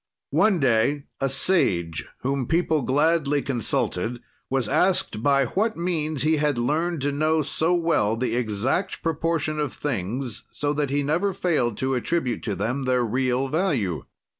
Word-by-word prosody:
"One 210 -5 +3
day, 135 +2 +2 0.2
a 135 - +1
sage, 85 - +1
whom 135 -1 -1
people 160 -2 +1
gladly 145 +2 +2
consulted, 120 -2 -1 0.3
was 130 -4 0
asked 180 - +1
by 140 +1 +3
what 215 - 0
means 160 -4 -1
he 155 +1 +3
had 145 -3 +1
learned 155 +6 0
to 145 - +1
know 155 +2 +1
so 160 +4 +1
well 165 -11 +1
the 120 -1 -1
exact 120 - -1
proportion 160 -1 -1
of 145 -4 -1
things, 120 -1 -3
so 145 0 -1
that 145 -2 -1
he 145 +1 0
never 175 +7 +1
failed 150 - 0
to 130 0 0
attribute 125 -1 -1
to 105 -4 -1
them 125 +8 -2
their 125 -1 +3
real 130 +3 0
value. 130 - 0
140 Hz, 155 wpm, -24 LUFS, 120-160 Hz, 0.3 s, One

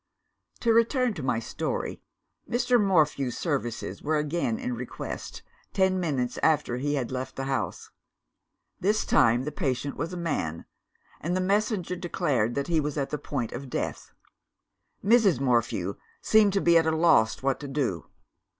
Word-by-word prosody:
"To 230 -1 +3
return 235 +1 +3
to 170 - -6
my 130 -3 0
story. 115 - -3 0.5
Mr. 245 0 +3
Morphew's 150 -9 +2
services 130 -8 -3
were 155 +1 0
again 170 +9 -1
in 250 0 -3
request, 240 - -6 0.3
ten 190 -1 +2
minutes 135 -8 -1
after 150 -6 +2
he 145 +3 -1
had 130 -3 -2
left 130 +1 -4
the 135 - -3
house. 135 0 -3 0.9
This 210 +4 +1
time 115 +2 +4
the 150 - -3
patient 140 -3 -2
was 165 - -3
a 180 - -5
man 110 - -2 0.5
and 175 +4 -1
the - - 0
messenger 195 -1 0
declared 145 - 0
that 140 - -1
he 165 -2 +2
was 150 0 -2
at 140 -2 -2
the 150 - -2
point 115 -3 -3
of 135 +2 -7
death. - - -4 0.9
"Mrs. 210 - +5
Morphew 115 -7 0 0.2
seemed 215 -2 +4
to 195 - +2
be 170 -1 +6
at 160 - 0
a - - +3
loss 155 -9 +3
what 135 0 +1
to 145 - -6
do. 130 - -2
150 Hz, 160 wpm, -27 LUFS, 130-185 Hz, 0.9 s, be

